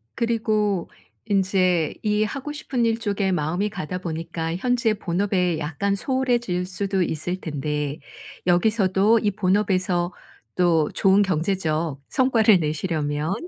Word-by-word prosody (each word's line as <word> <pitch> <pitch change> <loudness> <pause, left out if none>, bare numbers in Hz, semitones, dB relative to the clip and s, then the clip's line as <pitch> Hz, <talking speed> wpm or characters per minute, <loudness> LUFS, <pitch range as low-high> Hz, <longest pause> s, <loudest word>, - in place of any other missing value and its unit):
그리고 215 -5 0 0.4
인제 185 -5 +1
이 210 0 +2
하고 275 +7 -4
싶은 270 -5 -2
일 225 0 +1
쪽에 200 -3 -1
마음이 175 +5 0
가다 180 -3 -5
보니까 165 -1 -4
현재의 245 +1 +1
본업에 180 -1 0
약간 160 +7 -1
소홀해질 240 -6 0
수도 190 +1 -1
있을 175 +1 -1
텐데 150 -1 -3 0.5
여기서도 195 +3 +3
이 210 -1 0
본업에서 185 -3 +1 0.4
또 170 -4 +3
좋은 195 +1 +4
경제적 165 -4 -1
성과를 225 -7 +4
내시려면 155 0 -1
190 Hz, 270 characters per minute, -23 LUFS, 165-210 Hz, 0.5 s, 좋은